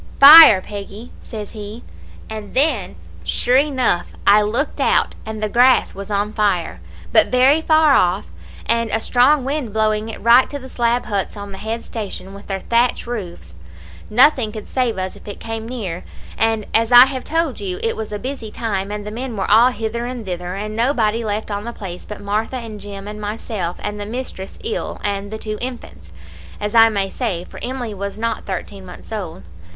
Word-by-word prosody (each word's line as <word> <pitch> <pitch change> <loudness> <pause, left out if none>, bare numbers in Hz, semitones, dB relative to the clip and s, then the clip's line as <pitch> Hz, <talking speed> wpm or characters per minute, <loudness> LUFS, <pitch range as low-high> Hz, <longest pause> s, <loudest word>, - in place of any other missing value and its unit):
"'Fire! 280 -8 +11
Peggy,' 205 +4 -9
says 215 -3 -8
he; 215 +1 -9 0.4
and 215 -2 -8
then, 265 - +1 0.3
sure 245 - +3
enough, 260 -11 +1 0.2
I 205 +1 +6
looked 230 +8 -1
out, - - +2
and 215 -1 -5
the - - +1
grass 250 +4 +4
was 200 +1 -8
on 205 +1 -1
fire, 180 - 0 0.3
but - - +6
very 265 +5 +4
far 315 -2 +4
off, 180 - +2 0.4
and 230 -1 +1
a 220 - +1
strong 255 +4 +3
wind 275 -6 -3
blowing 215 0 0
it 225 - -6
right 235 +3 +5
to 285 - -5
the 260 -1 -10
slab 240 0 0
huts 205 -1 -3
on 200 0 -7
the 195 - -9
head 225 +2 -4
station 195 -3 -7
with 200 +1 -12
their 195 -1 -3
thatch 235 +1 +1
roofs. 180 - -7 0.6
Nothing 250 -1 +4
could 215 -1 -8
save 250 -5 -1
us 185 0 -4
if - - -16
it 205 - -7
came 225 0 -6
near, 190 -9 -5 0.3
and 225 -1 0
as 225 +1 +2
I 245 +1 +10
have 265 -1 -5
told 325 -4 -1
you 190 -3 -4
it 225 - 0
was 220 -1 -6
a 210 - -3
busy 250 -1 -6
time, 200 -3 -3
and 210 0 -5
the 210 - -6
men 240 0 -5
were 195 - -1
all 230 +4 +7
hither 235 0 -4
and 245 -3 -6
thither, 180 0 -5
and 210 +2 -5
nobody 230 -2 +1
left 215 0 -3
on 205 0 -3
the 235 +1 -6
place 180 -5 -8
but 210 - -7
Martha, 210 +5 -2
and 220 -4 -8
Jim, 200 0 -8
and 210 0 -7
myself, 205 -4 -4
and 210 0 -4
the 205 - -5
mistress 225 -5 -6
ill, 450 +1 -4
and 205 +1 -3
two 215 -1 -5
infants, 240 - -8 0.5
as 210 0 -3
I 225 -1 +7
may 200 -3 -2
say, 200 -9 -3
for - - -11
Emily 245 -3 -4
was 200 0 -5
not 230 +1 -3
thirteen 195 +1 -5
months 180 +3 -12
old. 190 -7 -6
220 Hz, 195 wpm, -19 LUFS, 200-245 Hz, 0.6 s, Fire